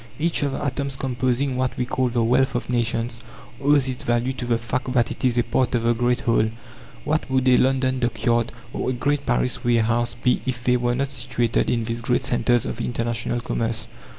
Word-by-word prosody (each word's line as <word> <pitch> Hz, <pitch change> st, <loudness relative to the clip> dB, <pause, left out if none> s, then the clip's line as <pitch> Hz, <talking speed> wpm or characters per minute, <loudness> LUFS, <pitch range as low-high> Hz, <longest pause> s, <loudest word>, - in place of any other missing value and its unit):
Each 165 Hz, +2 st, +1 dB
of 140 Hz, -2 st, 0 dB
the -, -, -3 dB
atoms 140 Hz, 0 st, -2 dB
composing 130 Hz, 0 st, -1 dB
what 130 Hz, -1 st, -1 dB
we 125 Hz, -, 0 dB
call 130 Hz, +1 st, 0 dB
the 120 Hz, -1 st, +1 dB
Wealth 125 Hz, +3 st, +2 dB
of 120 Hz, -, -2 dB
Nations 115 Hz, 0 st, -1 dB, 0.4 s
owes 140 Hz, -1 st, +4 dB
its 130 Hz, -1 st, -2 dB
value 120 Hz, +2 st, 0 dB
to 125 Hz, -, -5 dB
the 120 Hz, -1 st, +2 dB
fact 125 Hz, +3 st, -3 dB
that 120 Hz, -3 st, +2 dB
it -, -, -7 dB
is 125 Hz, -2 st, +2 dB
a 120 Hz, -, +4 dB
part 125 Hz, +2 st, 0 dB
of 115 Hz, -, 0 dB
the 120 Hz, 0 st, +3 dB
great 120 Hz, +1 st, +1 dB
whole. 115 Hz, -2 st, +2 dB, 0.5 s
What 155 Hz, -1 st, -1 dB
would 130 Hz, -1 st, +1 dB
a 125 Hz, -, +6 dB
London 130 Hz, 0 st, +2 dB
dockyard 120 Hz, -1 st, 0 dB, 0.2 s
or -, -, -2 dB
a -, -, 0 dB
great 145 Hz, +3 st, -1 dB
Paris 125 Hz, +1 st, 0 dB
warehouse 120 Hz, 0 st, +1 dB
be 125 Hz, +2 st, +1 dB
if 120 Hz, -2 st, -2 dB
they 125 Hz, 0 st, +3 dB
were 120 Hz, 0 st, 0 dB
not 135 Hz, +1 st, -1 dB
situated 125 Hz, -3 st, 0 dB
in 115 Hz, -1 st, +1 dB
these 115 Hz, +1 st, -3 dB
great 125 Hz, +2 st, 0 dB
centres 120 Hz, -2 st, +2 dB
of -, -, -4 dB
international 120 Hz, 0 st, -1 dB
commerce? 115 Hz, -1 st, -2 dB
125 Hz, 210 wpm, -23 LUFS, 120-130 Hz, 0.5 s, a